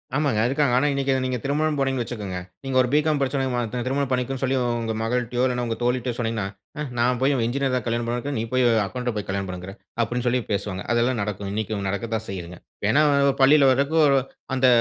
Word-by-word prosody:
ஆமாங்க 140 -7 +1
,இருக்காங்க. 140 -1 +1
ஆனா 130 - +3
இன்னைக்கு 135 -1 +1
நீங்க 130 -1 -1
திருமணம் 150 +2 0
போனீங்கன்னு 135 -2 +1
வச்சுக்கோங்க. 105 -6 -5 0.3
நீங்க 135 -1 -1
ஒரு 125 - +1
பிகாம் 150 0 +3
படிச்சவன 125 -3 -1
திருமணம் 140 0 0
பண்ணிக்கோன்னு 130 +1 -1
சொல்லி 135 0 +1 0.2
உங்க 115 -1 -2
மகள்ட்டையோ, 120 +1 0
இல்ல 125 -1 -1
உங்க 115 -1 -2
தோழி 125 +1 +2
கிட்டயோ 125 -1 -3
சொன்னீங்கன்னா, 115 -4 -1 0.3
"ஆ - - -1 0.2
நான் 125 +1 +2
போய் 135 +2 +3
என்ஜினியர் 135 +1 0
தான் 125 - -2
கல்யாணம் 120 0 -1
பண்ணுவேன்ங்கற. 120 +4 -2
நீ - - -1
போய் 130 -1 +3 0.2
அக்கவுண்ட்ட 120 +4 -3
போய் 105 - -4
கல்யாணம் 100 -1 -2
பண்ணுங்கற?" 90 +1 -7 0.3
அப்படின்னு 120 +2 -3
சொல்லி 125 +1 +2
பேசுவாங்க. 100 -1 -2
அதெல்லாம் 120 +1 +1
நடக்கும், 100 -1 -3
இன்னைக்கு 110 0 -2
நடக்க 100 +4 -3
தான் 110 0 -3
செய்யுதுங்க. 90 -2 -6 0.3
ஏன்னா 150 +5 +4 0.4
பள்ளியில 140 0 +6
வர்றதுக்கு 140 +5 +2 0.5
அந்த 130 0 +4
125 Hz, 195 wpm, -24 LUFS, 110-135 Hz, 0.5 s, பள்ளியில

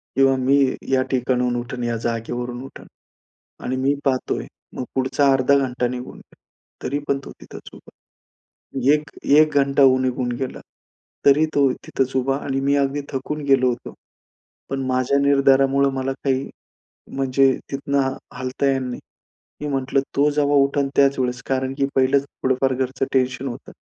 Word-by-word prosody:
किंवा 135 0 +4
मी 130 +2 +3 0.3
या 130 -1 +3
ठिकाणाहून 125 -1 0
उठून, 120 +1 -4
या 120 -1 -1
जागेवरून 120 +2 -4
उठेन. 135 - -12 0.8
आणि 130 - -2
मी 135 +2 +2
पाहतोय. 130 -2 -1 0.3
मग - - -3
पुढचा 135 +1 +2
अर्धा 135 +1 +3
घंटा 125 -2 -1
निघून 125 0 -6
गेला, - - -19 0.5
तरी 140 +3 -1
पण 140 - +1
तो - - -9
तिथंच - - -11
उभा - - -15 0.9
होता. 130 +2 +1
1, 150 0 -1
1 155 +2 +4
घंटा 140 0 +2
होऊ 130 -1 +6
निघून 125 -1 -1
गेला, 130 -1 -4 0.7
तरी 145 +3 +6
तो 140 -2 +4
तिथंच 130 0 -3
उभा 135 +1 +1
आणि 135 -1 -1
मी 140 +1 +2
अगदी 140 +1 0
थकून 150 +3 -4
गेलो 135 -2 +4
होतो, 120 -1 -5 0.8
पण 135 0 -2
माझ्या 130 +2 +1
निर्धारामुळं 140 0 +3
मला 135 0 -2
काही 135 -1 0 0.7
म्हणजे 135 0 +3 0.2
तिथून 140 0 -3 0.4
हलता 130 +2 -3
येणार 135 -1 +2
नाही. 125 - -5 0.6
मी 150 - -3
म्हटलं, 135 0 0 0.2
तो 145 +2 +4
जेव्हा 145 0 +1
उठेल 140 0 0
त्याच 140 -1 +3
वेळेस, 125 -1 -1
कारण 130 0 -1
की 140 - +2
पहिलंच 135 +1 +3 0.2
थोडंफार 130 0 +1
घरचं 130 +1 -2
टेन्शन 130 0 0
होतं. 120 - -8
135 Hz, 160 wpm, -21 LUFS, 130-140 Hz, 0.9 s, होऊ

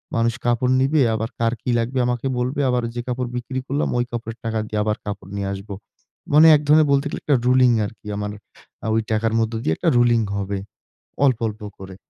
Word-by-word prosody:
মানুষ 115 0 +2
কাপড় 120 +1 +2
নিবে, 140 +3 +3
আবার 110 +1 -3
কার 115 0 +1
কি - - -4
লাগবে 125 +3 -1
আমাকে 125 +1 -1
বলবে। 130 +3 -1
আবার 125 -1 +1
যে 120 - -2
কাপড় 125 0 -2
বিক্রি 125 +2 -4
করলাম 140 +2 -1
ঐ - - +1
কাপড়ের 115 -1 -5
টাকা 115 0 -1
দিয়ে 110 -1 -2
আবার 105 0 -1
কাপড় 100 -2 -6
নিয়ে 100 -1 -2
আসবো। 100 +1 -7 0.6
মানে 155 +2 +8
এক 145 - +1
ধরনের 155 +1 +5
বলতে 140 +1 +2
গেলে - - -5
একটা 145 - +3
রুলিং 125 0 +5
আরকি, 105 +1 -10
আমার 105 0 -3 0.5
আ - - -1
ঐ - - +2 0.2
টাকার 110 +1 +1
মধ্যে 115 0 -1
দিয়ে 80 - +1
একটা - - +1
রুলিং 120 -1 +4 0.2
হবে। 100 0 -2 0.7
অল্প, 130 -4 +2
অল্প 105 0 -10 0.2
করে। 95 -1 -9
120 Hz, 210 wpm, -22 LUFS, 110-130 Hz, 0.7 s, মানে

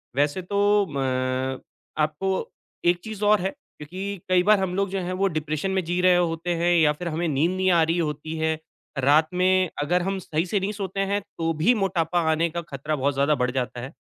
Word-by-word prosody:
वैसे 145 +6 +1
तो 205 +2 +2
म 130 0 -1 0.4
आपको 155 +5 -1 0.6
एक 175 0 +4
चीज़ 215 -2 -6
और 210 -1 +4
है, 190 - 0
क्योंकि 195 - -8
कई 180 -1 +4
बार 210 0 +5
हम 190 -2 -1
लोग 200 0 0
जो 195 0 -2
हैं 180 +1 -3
वो 195 - +3
डिप्रेशन 155 +4 -2
में 190 -1 0
जी 175 +2 -1
रहे 180 0 +5
होते 175 0 0
हैं 175 +1 +2
या 155 -2 +5
फिर 175 +4 -6
हमें 170 +1 -1
नींद 155 +3 +1
नहीं 185 0 +1
आ 170 -2 +4
रही 165 +2 0
होती 155 -1 -3
है। 160 0 0 0.4
रात 145 +4 +4
में 185 0 +3
अगर 175 +5 +1
हम 195 +2 -2
सही 160 -2 -2
से 200 +3 0
नहीं 195 +2 -2
सोते 195 -2 -5
हैं, 200 +1 0
तो 165 -5 -3
भी 165 +11 +3
मोटापा 180 -4 0
आने 165 +2 +1
का 170 +1 -4
खतरा 150 +2 -3
बहुत 140 0 0
ज़्यादा 140 +2 +2
बढ़ 125 -1 0
जाता 125 -1 -3
है। 135 +5 -8
175 Hz, 215 wpm, -24 LUFS, 150-190 Hz, 0.6 s, बार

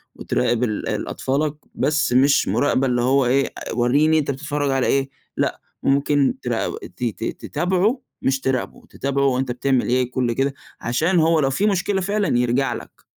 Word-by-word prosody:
وتراقب 120 0 0
ال 110 -4 -2
ال - - -2
أطفالك، 145 +3 -1 0.2
بس 150 -3 +1
مش 135 +3 +4
مراقبة 135 -2 +2
اللي 120 -1 +1
هو 130 +2 +3
إيه، 135 +3 +2 0.3
وريني 145 +7 +3
أنت 140 -2 -1
بتتفرّج 145 0 -2
على 135 -1 +1
إيه، 135 0 +1 0.3
لأ - - -1 0.2
ممكن 140 0 +2
تراق 120 -2 -2 0.2
ت - - -6
ت 115 -4 -2 0.2
تتابعه 190 +8 0 0.2
مش 135 0 +1
تراقبه، 130 -2 -2
تتابعه 140 +1 -1
هو 130 -2 +2
أنت 130 -2 -1
بتعمل 125 +1 0
إيه 125 0 +1
كلّ 125 -2 0
كده، 135 +3 0 0.3
عشان 160 +10 +1
هو 160 0 +3
لو 135 -3 +2
في 165 +10 0
مشكلة 195 0 0
فعلًا 200 - 0
يرجع 125 +1 +1
لك. - - -10
135 Hz, 175 wpm, -21 LUFS, 125-155 Hz, 0.3 s, مش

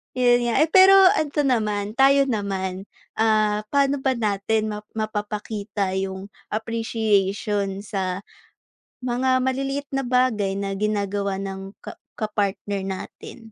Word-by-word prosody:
Yun 245 -1 +3
nga, 235 - 0
eh. 315 - +3
Pero 380 +3 +7 0.2
ito 295 -1 0
naman, 215 -5 -1
tayo 275 0 +5
naman. 195 -4 -3 0.3
Ah, 215 -1 +2
paano 280 0 +3
ba 265 -1 0
natin 215 -1 0
map 210 0 -6
mapapakita 210 -1 -3
yung 190 +1 -4 0.2
appreciation 210 -3 -1
sa 195 -2 -3 0.8
mga 255 +1 +1
maliliit 275 +2 -2
na 270 -2 -2
bagay 235 -6 +1
na 200 0 -3
ginagawa 200 -1 -1
ng 195 0 -7
ka - - -9 0.2
kapartner 205 -2 -2
natin? 190 +5 -7
215 Hz, 120 wpm, -23 LUFS, 200-250 Hz, 0.8 s, Pero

